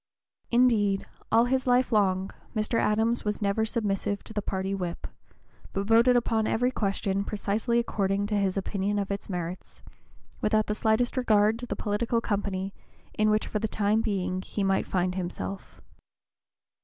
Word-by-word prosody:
Indeed, 225 -5 +3 0.3
all 230 +1 +5
his 260 +1 0
life 250 +1 +3
long 190 -3 +2 0.2
Mr. 215 +2 +1
Adams 225 +3 +2
was 210 -1 -2
never 205 +2 +1
submissive 205 -2 -1
to - - -10
the 210 - -1
party 190 -1 -2
whip, 180 -3 -4 0.7
but 195 0 -1
voted 230 +3 +5
upon 225 -2 +1
every 245 +3 +1
question 195 -2 -1
precisely 210 +3 -1
according 200 -4 0
to 210 0 -1
his 195 -1 +1
opinion 200 +1 -1
of 200 -1 -2
its 200 +1 -4
merits, 180 -1 -6 0.6
without 215 0 +2
the 210 - -1
slightest 220 +4 +1
regard 220 -2 +3
to 245 - -6
the - - -3
political 230 +3 0
company 200 -3 -2 0.4
in 215 0 +2
which 215 0 +2
for 210 - -2
the 220 - -1
time 210 +1 +1
being 185 -4 -1
he 200 +1 -3
might 195 0 +1
find 180 -1 0
himself. 185 +1 -5
210 Hz, 160 wpm, -27 LUFS, 195-225 Hz, 0.7 s, all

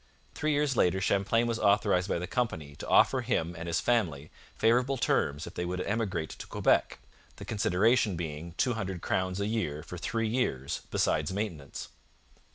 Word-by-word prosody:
Three 155 - -1
years 145 -2 +1
later 95 -3 +3
Champlain 100 +4 +2
was 115 -1 -1
authorized 100 -2 +3
by - - +1
the 85 - -3
company 80 - -2
to - - -7
offer - - +4
him 85 +1 -1
and 85 0 -6
his 85 -1 +1
family 80 -12 0 0.2
favourable 125 +4 +2
terms 75 - +1
if - - -9
they 90 - -3
would 90 +1 -3
emigrate 100 -6 -2
to - - -9
Quebec, - - +2 0.4
the - - -9
consideration 105 +1 +2
being 80 0 -5
two 125 - +2
hundred 95 -6 -4
crowns 95 0 -1
a 100 - 0
year 100 -9 -2
for 90 - -8
three 115 +5 -1
years, 110 - -1
besides 75 +2 +1
maintenance. 95 -9 -5
95 Hz, 170 wpm, -29 LUFS, 85-115 Hz, 0.4 s, offer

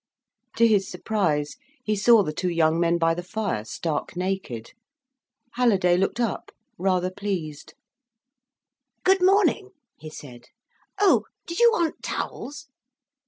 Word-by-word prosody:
To 230 - +5
his 205 -3 +2
surprise 155 -9 -1 0.3
he 215 -2 0
saw 215 +1 +5
the 155 - -4
two 180 +4 -2
young 165 -1 +2
men 170 0 +2
by 165 -1 +2
the 175 - -4
fire, 190 - -3
stark 155 +8 -4
naked. 180 -11 -4 0.8
Halliday 195 -8 +3
looked 195 +5 0
up, 235 -3 -2 0.3
rather 185 -1 +1
pleased. 185 -7 -5 1.3
"Good 380 0 +4
morning," 390 +1 +3 0.3
he 155 - -9
said. 125 -5 -12 0.5
"Oh—did 370 -3 +1
you 475 0 +7
want 340 -8 -1
towels?" 280 0 -5
190 Hz, 120 wpm, -24 LUFS, 165-230 Hz, 1.3 s, you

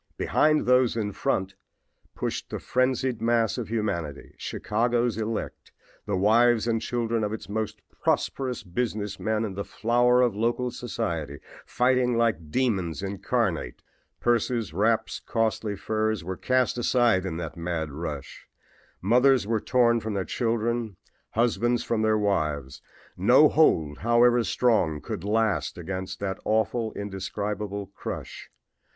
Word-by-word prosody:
Behind 155 0 +2
those 125 -2 +3
in 105 -2 -1
front 95 -1 -1 0.6
pushed - - -3
the - - -4
frenzied 130 -1 0
mass 115 0 +1
of 115 - -4
humanity, 100 -10 -3
Chicago's 120 +1 0
elect, 110 0 -4 0.4
the 100 -2 0
wives 115 +3 +4
and 115 -1 +1
children 115 -2 -1
of 105 - -1
its 110 - -6
most 110 +1 -3 0.2
prosperous 130 -3 0
business 105 +1 -3
men 110 0 0
and 100 -3 -5
the 100 - -3
flower 120 +4 +2
of 120 -5 +1
local 120 +3 0
society, 85 - -4 0.3
fighting 125 -1 +2
like 105 -10 0
demons 95 -6 0
incarnate. 100 -1 -2 0.4
Purses, 120 -4 0
wraps, 110 +5 +1
costly 110 -2 -1
furs 110 -1 -1
were 95 +2 -4
cast 130 +3 +1
aside 120 -5 +3
in 90 -4 -4
that 80 -4 -5
mad 85 -3 -3
rush. 75 -2 -7 0.6
Mothers 125 +4 +4
were 110 0 0
torn 120 -2 +3
from 110 -1 -4
their 95 -2 -1
children, 115 -2 -1 0.4
husbands 120 +1 +1
from 115 -2 -1
their 110 0 +3
wives. 75 -9 -1 0.3
No - - +6
hold, 75 -2 +3
however 120 +2 +4
strong, 110 -12 +1
could 80 - -6
last 105 -4 0
against 95 +2 -5
that 95 -2 -3
awful, 110 +1 0
indescribable 100 0 -4
crush. - - -7
110 Hz, 135 wpm, -26 LUFS, 95-120 Hz, 0.6 s, No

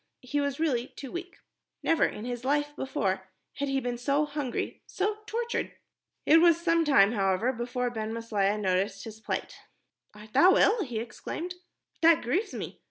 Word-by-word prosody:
He 285 +3 -1
was 280 0 -2
really 260 -7 +1
too 275 -2 -9
weak. 355 +1 -6 0.5
Never 330 - +3
in 210 - -4
his 245 -1 -4
life 290 +2 0
before 190 -9 -2 0.3
had 285 0 -1
he 270 0 +1
been 245 -2 -3
so 280 +4 +1
hungry, 285 -4 -4
so 415 +2 -1
tortured. 475 +1 -2 0.5
It 325 +2 +7
was 335 -1 +5
some 335 -1 +2
time, 220 -10 +5
however, 200 +3 +1
before 245 +1 -2
Ben 220 -2 -4
Maslia 215 -3 0
noticed 195 +1 0
his 220 -1 -9
plight. - - -4 0.6
"Art 210 +1 -13
thou 360 +8 +6
ill?" 420 +1 +4
he 245 -7 -5
exclaimed. 320 +9 -5 0.5
"That 330 -1 +5
grieves 365 - 0
me. - - -6
260 Hz, 165 wpm, -28 LUFS, 220-320 Hz, 0.6 s, It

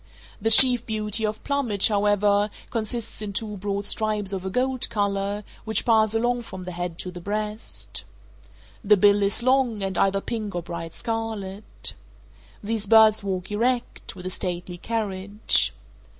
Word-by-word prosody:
The 225 - +1
chief 245 +1 +7
beauty 215 0 -1
of 210 0 -5
plumage, 245 -9 +2
however, 205 0 +2 0.2
consists 230 0 -3
in 205 -1 -5
two 210 0 -4
broad 200 +1 -3
stripes 210 -2 +1
of 190 -1 -3
a 190 - -3
gold 255 +4 0
color, 200 0 -1 0.2
which 220 0 -1
pass 220 -2 +3
along 240 +2 +1
from 190 -5 -9
the 180 - -6
head 175 -1 -4
to 180 - -6
the 175 -1 -9
breast. 210 - -4 0.8
The 210 0 +5
bill 205 +1 +5
is 200 +4 +1
long, 255 -5 +2
and 195 0 -1
either 195 0 +3
pink 215 -2 -4
or 175 - -2
bright 165 -1 -7
scarlet. 220 -4 -3 0.7
These 215 0 -2
birds 220 -1 +6
walk 190 -1 -3
erect; 240 +2 -1
with 180 -1 -10
a 185 - -3
stately 180 -1 -4
carriage. 205 -2 0
210 Hz, 155 wpm, -24 LUFS, 195-225 Hz, 0.8 s, chief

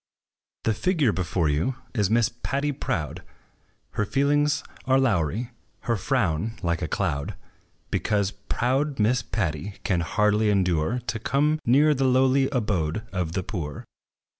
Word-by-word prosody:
The 115 - +2
figure 145 - +2
before 90 -3 0
you 75 - 0 0.2
is 105 -5 +1
Miss 115 0 +4
Patty 140 +4 -2
Proud: 85 - -3 0.7
Her 105 - 0
feelings 145 +6 +2 0.2
are 130 0 +4
lowery, 115 - 0 0.3
her 115 - 0
frown 110 - 0
like 85 -1 0
a - - -1
cloud; 70 -1 -2 0.6
Because 100 -2 +1
proud 135 +7 -1
Miss 115 +3 +2
Patty 95 -1 -3
can 90 -5 +1
hardly 105 +4 +2
endure 90 0 +1
To 110 - -2
come 150 +6 +1
near 145 +5 +5
the 135 -1 0
lowly 130 +1 +4
abode 105 - -1
of 90 -4 -2
the 95 - -1
poor. 80 -8 -5
110 Hz, 140 wpm, -25 LUFS, 90-130 Hz, 0.7 s, near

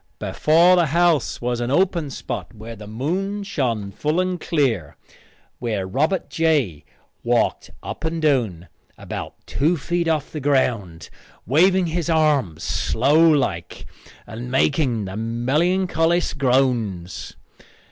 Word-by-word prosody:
Before 170 +4 +4
the 175 -2 +3
house 170 -1 +2
was 120 0 -1
an 120 - -2
open 170 0 +1
spot 125 - -6
where 110 +2 -9
the 105 -1 -11
moon 185 - -2
shone 120 - -2
full 150 - -1
and 185 -2 -1
clear, 120 - -1 0.6
where 110 -5 -2
Robert 155 - 0
J. 145 - 0 0.4
walked - - 0
up - - -7
and 165 +1 -2
down, 120 - 0 0.3
about - - -7
two 160 +5 +1
feet 170 +3 -1
off 155 -3 -1
the 155 - -5
ground, 115 - -1 0.3
waving 180 - +4
his 170 0 -2
arms 145 - +1
slow 150 +8 +3
like 100 - -1 0.4
and 120 +3 -7
making 130 -4 +1
the 95 0 -6
melancholiest 165 - +1
groans. 120 -9 0
140 Hz, 125 wpm, -22 LUFS, 115-165 Hz, 0.6 s, Before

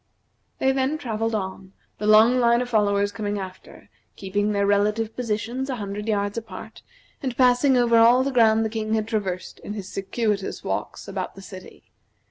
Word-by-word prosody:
They 265 - +2
then 265 +3 0
travelled 225 -4 -2
on, 190 -1 -5 0.3
the 210 - -2
long 220 +4 +6
line 235 -1 +4
of 245 - -8
followers 205 -2 +2
coming 205 -1 -3
after, 190 -1 -9 0.3
keeping 205 +2 -1
their 200 -1 +1
relative 210 +2 +1
positions 240 +3 -3
a 260 - -1
hundred 205 -1 -5
yards 205 0 0
apart, 220 0 -11 0.4
and 255 -4 -4
passing 255 +1 +4
over 235 -1 +4
all 240 +3 +6
the 275 - -1
ground 225 -3 +4
the - - -1
King 220 0 -2
had 215 -1 -1
traversed 195 -5 -3
in 205 - -7
his 200 -3 -7
circuitous 200 0 -2
walks - - -4
about - - -5
the 195 - -11
city. 185 -1 -12
215 Hz, 175 wpm, -24 LUFS, 205-235 Hz, 0.4 s, long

